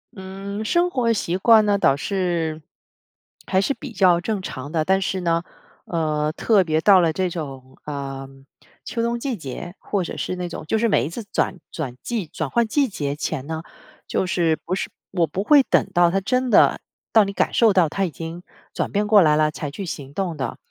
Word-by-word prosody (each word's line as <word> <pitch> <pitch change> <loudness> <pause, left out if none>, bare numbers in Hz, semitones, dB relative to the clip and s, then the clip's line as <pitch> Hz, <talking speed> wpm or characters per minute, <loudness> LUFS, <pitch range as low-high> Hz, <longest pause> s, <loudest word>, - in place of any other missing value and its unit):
嗯， 195 +2 -6
生 345 +10 +2
活 250 -7 +1
习 185 -5 -1
惯 220 +1 +6
那 205 -1 +3
倒 135 - +3
是， 170 -3 -1 0.8
还 190 - +1
是 200 - +1
比 280 -2 -9
较 185 -4 +4
正 210 0 -2
常 145 -5 -7
的。 160 -2 0
但 190 +2 +2
是 190 0 -1
呢， 170 0 +1 0.4
呃， 155 -2 -1
特 205 +3 +3
别 155 -2 +1
到 190 +2 +6
了 165 -2 +2
这 185 +3 -1
种， 135 -6 -7
呃， 135 -2 -5 0.6
秋 230 - -3
冬 235 0 -1
季 260 0 -2
节， 175 - -7
或 200 -3 -2
者 - - -6
是 - - -3
那 180 - -3
种， 170 - -7
就 220 - 0
是 230 +1 +2
每 - - +2
一 150 - -4
次 215 +6 -7
转 185 - 0
转 130 -6 -5
季 230 -6 -2
转 150 -2 -4
换 235 - +2
季 275 +4 +2
节 145 -8 -3
前 150 -3 -3
呢， 160 0 -4 0.4
就 - - 0
是， 170 -3 +1
不 185 - -1
是 - - -3 0.2
我 175 -4 +1
不 195 - -3
会 290 +4 +6
等 - - +2
到 175 -1 +5
它 195 +2 0
真 255 +5 0
的， - - +5 0.3
到 220 -2 +6
你 200 - -5
感 - - 0
受 225 -3 +4
到 175 -5 +4
它 195 +4 -1
已 175 - -2
经 165 +3 -8 0.3
转 - - -2
变 205 +1 0
过 205 -2 +7
来 150 -2 +4
了 155 0 +2
才 150 - -5
去 190 +8 -6
行 140 -5 -7
动 180 -4 -2
的。 130 -4 -4
180 Hz, 230 characters per minute, -22 LUFS, 155-205 Hz, 0.8 s, 过